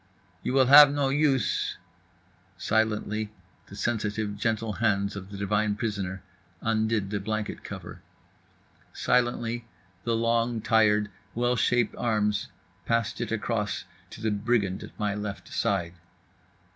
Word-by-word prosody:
"You - - -2
will 135 -1 +5
have 145 +2 +10
no 140 -1 +1
use…." 140 -4 +1 0.8
Silently 110 -1 0 0.4
the 100 - -11
sensitive, 105 -2 -1
gentle 110 +1 -1
hands 100 -2 0
of 100 -1 -7
the 100 - -8
divine 105 +1 +1
prisoner 100 -4 -3 0.4
undid 110 -2 0
the 105 - -1
blanket 110 +1 -3
cover. - - -8 0.9
Silently 120 -1 0 0.4
the 115 -1 0
long, 115 0 +1
tired, 110 -2 +3 0.2
well 120 +1 +1
shaped 120 0 +2
arms 105 -3 +1 0.4
passed 115 -1 0
it 115 - -3
across 110 -2 -1 0.3
to - - -11
the 110 -1 0
brigand 105 -2 0
at - - -11
my 105 -1 0
left 105 -1 -5
side. 85 -4 0
110 Hz, 125 wpm, -27 LUFS, 105-115 Hz, 0.9 s, have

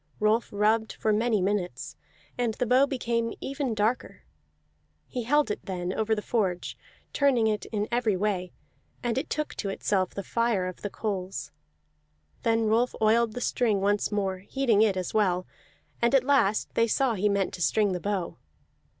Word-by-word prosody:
Rolf 215 +2 +2
rubbed 215 +2 +1
for 215 - 0
many 215 -2 +1
minutes, 195 -2 -2 0.4
and 235 -3 -1
the 250 - -1
bow 255 +4 +4
became 235 -4 -1
ever 275 -2 -3
darker; 215 +4 -1 0.8
he 250 - -4
held 295 0 +3
it - - -4
then 180 -2 -3
over 220 0 +1
the 210 - -4
forge, 190 -7 -1 0.4
turning 270 -6 +3
it 215 -1 0
in 210 -1 -2
every 235 -5 +1
way, 185 -2 -1 0.5
and 240 -1 0
it 270 +5 -2
took 305 -1 -2
to 200 - -2
itself 190 -1 -1
the 200 - -4
fire 230 -3 0
of 185 -1 -6
the 205 - -3
coals. 195 -3 -4 0.9
Then 225 0 +2
Rolf 230 +3 +2
oiled 220 +1 +3
the 245 - -5
string 225 -5 +1
once 205 +2 +1
more, 195 -2 -1
heating 225 +1 +1
it 205 -4 +3
as 185 - -3
well; 185 -4 +2 0.6
and 235 +3 +3
at 265 - +5
last 255 -7 +2
they 230 - +3
saw 255 +2 +2
he 210 0 +1
meant 200 -1 0
to 175 - -7
string 205 +3 +2
the 180 - -2
bow. 195 -3 -3
215 Hz, 175 wpm, -27 LUFS, 200-235 Hz, 0.9 s, at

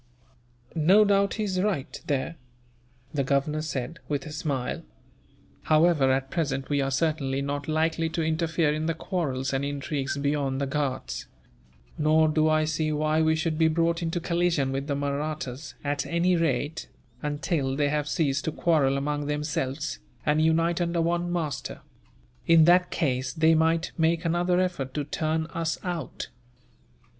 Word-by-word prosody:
"No 185 +7 +5
doubt 200 0 +2
he 215 - -2
is 185 -3 0
right, 190 -9 -2
there," 145 +4 -1 0.8
the 140 -2 +1
Governor 140 +3 0
said, 155 +1 -4
with 145 -2 -2
a 155 - -7
smile. 150 -2 -2 0.8
"However, 155 -4 +4
at 135 0 -1
present 135 -5 -2
we 145 -1 +2
are 135 - 0
certainly 135 -1 0
not 145 0 -3
likely 160 +1 +1
to 165 0 -2
interfere 160 -1 +1
in 155 +1 -2
the 165 - 0
quarrels 140 -7 -2
and 135 +1 0
intrigues 140 0 -2
beyond 140 -1 0
the 140 - 0
Ghauts; 140 -1 -3 0.7
nor 155 +1 +4
do 155 0 +2
I 155 0 +3
see 155 0 -1
why 155 +1 +1
we 160 0 +3
should 160 0 -1
be 160 - +5
brought 165 +1 +1
into 165 +1 -1
collision 170 -5 +1
with 135 +1 -3
the 145 - 0
Mahrattas 140 -1 -3
at 145 0 -1
any 175 +2 +2
rate, 160 -1 -1 0.3
until 145 -2 -1
they 145 0 +1
have 150 0 -1
ceased 140 -3 0
to 160 - 0
quarrel 145 -5 +2
among 145 +1 -2
themselves, 150 - -2 0.3
and 150 +1 +3
unite 165 +2 +2
under 170 0 0
one 175 +1 0
master. 155 -6 -3 0.7
In 165 -1 +7
that 180 +1 +5
case, 130 -4 -1
they 160 0 +4
might 160 +1 +2
make 165 +1 +2
another 175 +2 +2
effort 175 -8 -2
to 150 - 0
turn 155 +2 -1
us 165 -1 -1
out. 175 -6 -4
155 Hz, 160 wpm, -26 LUFS, 140-165 Hz, 0.8 s, In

